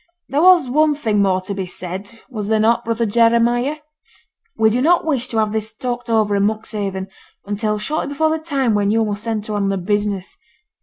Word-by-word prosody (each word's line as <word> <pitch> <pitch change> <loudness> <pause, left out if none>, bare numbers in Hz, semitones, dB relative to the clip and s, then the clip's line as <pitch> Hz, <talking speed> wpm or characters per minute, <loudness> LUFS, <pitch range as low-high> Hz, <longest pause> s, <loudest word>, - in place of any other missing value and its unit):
There 285 +2 +1
was 355 -5 +6
one 300 +3 +2
thing 220 -8 0
more 190 -2 +2
to 190 +2 -5
be 190 -2 -4
said, 190 +5 -8
was 215 -6 -5
there 220 0 +2
not, 225 +2 +2
brother 230 0 -1
Jeremiah? 235 +5 +2 0.8
We 220 0 +4
do 245 +3 +1
not 340 +4 +3
wish 265 -6 0
to 230 - -4
have 215 -1 +1
this 220 0 -2
talked 245 0 -4
over 215 -2 +2
in 200 - +1
Monkshaven 205 -3 -4 0.4
until 210 +1 -1
shortly 300 +10 -2
before 315 +3 0
the 320 - -1
time 275 -7 0
when 205 -1 +1
yo' 225 +1 +2
must 210 +2 -4
enter 215 -1 -2
on 200 -1 0
the 195 - 0
business. 200 0 -2
220 Hz, 200 wpm, -19 LUFS, 205-245 Hz, 0.8 s, was